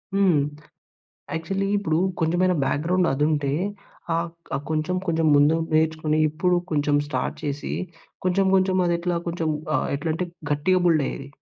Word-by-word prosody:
హ్మ్. 185 -7 +4 1.0
యాక్చువలి 195 +4 -2
ఇప్పుడు 160 -5 0 0.2
కొంచెమైనా 175 +3 +2
బ్యాక్‌గ్రౌండ్ 175 +6 +1
అదుంటే 145 0 +1 0.6
ఆహ్, 170 +1 0 0.3
ఆహ్, 140 - -2
కొంచెం, 155 +4 0
కొంచెం 165 -1 +1
ముందు 145 +2 +5 0.2
నేర్చుకొని 155 -1 +1
ఇప్పుడు 175 +4 +1
కొంచెం 145 -1 +2
స్టార్ట్ 130 -3 -2
చేసి 145 0 -3 0.5
కొంచెం, 185 +2 +2
కొంచెం 190 0 +3
అదెట్లా 170 0 0
కొంచెం 165 -2 -2 0.3
ఆహ్, - - 0
ఎట్లా 160 +3 -3
అంటే 180 +2 -2 0.3
గట్టిగా 180 +6 +2
బిల్డ్ 155 -4 +3
అయ్యేది. 140 0 -6
160 Hz, 135 wpm, -24 LUFS, 150-180 Hz, 1.0 s, ముందు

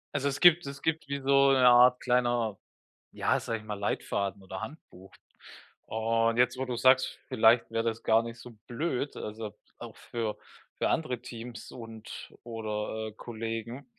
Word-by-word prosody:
Also, 140 0 +1
es 140 +1 -2
gibt 175 -3 +6
es 140 0 -7
gibt 160 -2 -1
wie 140 0 -3
so 140 0 +5
'ne 130 -2 +4
Art 125 +1 +7
kleiner, 120 -4 +1 0.5
ja, - - +1
sage 115 -1 -3
ich - - -14
mal, 105 -1 -4
Leitfaden 100 -1 -2
oder 95 0 -7
Handbuch. 95 - -10 0.8
Und 115 +1 +1
jetzt, 125 +1 +3
wo 130 - -2
du's 125 -2 -4
sagst, 130 +1 +4
vielleicht 115 +2 +4
wäre 115 0 0
das 115 0 -2
gar 115 +1 +4
nicht 115 0 -8
so 125 - -11 0.2
blöd. 140 +1 -2
Also, 105 0 -6 0.3
auch - - -9
für 115 -3 -4 0.4
für - - +1
andere 125 -7 -1
Teams 120 -1 -9
und 115 -2 -9
oder, 110 -1 -4
äh, - - -12
Kollegen, 115 +3 -6
115 Hz, 165 wpm, -29 LUFS, 110-130 Hz, 0.8 s, Art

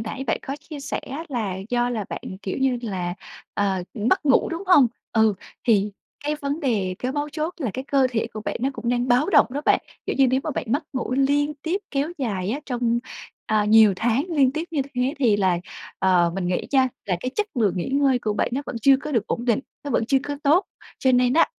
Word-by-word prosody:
nãy 255 +5 -5
bạn 220 - +1
có 275 +2 -3
chia 300 -3 -9
sẻ - - -3
á 290 +5 -6
là 215 -8 -2
do 245 0 +1
là 215 -4 -2
bạn, - - -6 0.2
kiểu 190 - -3
như 265 -2 +1
là, 180 -5 -3 0.4
ờ, 195 -3 0
mất 245 - +1
ngủ, 270 - +4
đúng 335 +3 -4
hông? 295 -9 +7 0.3
Ừ, 220 -2 +4 0.3
thì 210 -4 +3 0.3
cái 300 +1 0
vấn 285 +2 -3
đề, 205 -9 0
cái 255 +1 -2
mấu 295 +1 -2
chốt 310 +3 -3
là 260 - -2
cái 260 - -4
cơ 275 -2 +3
thể 230 -1 -1
của 215 - -6
bạn - - -3
nó 265 - +1
cũng 235 - -5
đang 245 +1 +1
báo 255 +10 +3
động - - +6
đó 280 +3 -3
bạn. - - +4 0.3
Kiểu - - -1
như, 270 - +6
nếu 260 +1 +2
mà 310 - -1
bạn - - -3
mất 290 - 0
ngủ 255 -1 -2
liên 285 +2 +2
tiếp 360 +5 -1
kéo 280 +2 0
dài 200 -7 -2
á 280 +6 -2
trong, 240 -2 0 0.5
ờ, 215 -1 +2
nhiều 215 -1 +6
tháng 240 - +1
liên 280 -6 +3
tiếp 315 +3 -2
như 290 -4 0
thế 250 +3 0
thì 225 -7 +3
là, 185 -3 +2 0.4
ờ, 180 -2 +3
mình 185 -2 -2
nghĩ 180 - -1
nha, 265 -1 +4 0.2
là 180 -3 +1
cái 255 - -3
chất 425 -1 0
lượng 215 -6 +2
nghỉ 180 - -2
ngơi 270 -2 +3
của 215 -3 -1
bạn 205 - 0
nó 270 - 0
vẫn - - -5
chưa 275 -1 +7
có 300 +2 -6
được 225 -4 +1
ổn 240 - -2
định, 240 +1 +2 0.2
nó 285 - -4
vẫn 225 - +1
chưa 270 +1 +3
có 290 0 -4
tốt. 315 +7 +4 0.3
Cho 260 -1 +3
nên 250 0 +4
á, 330 - +5
255 Hz, 245 wpm, -23 LUFS, 220-280 Hz, 0.5 s, hông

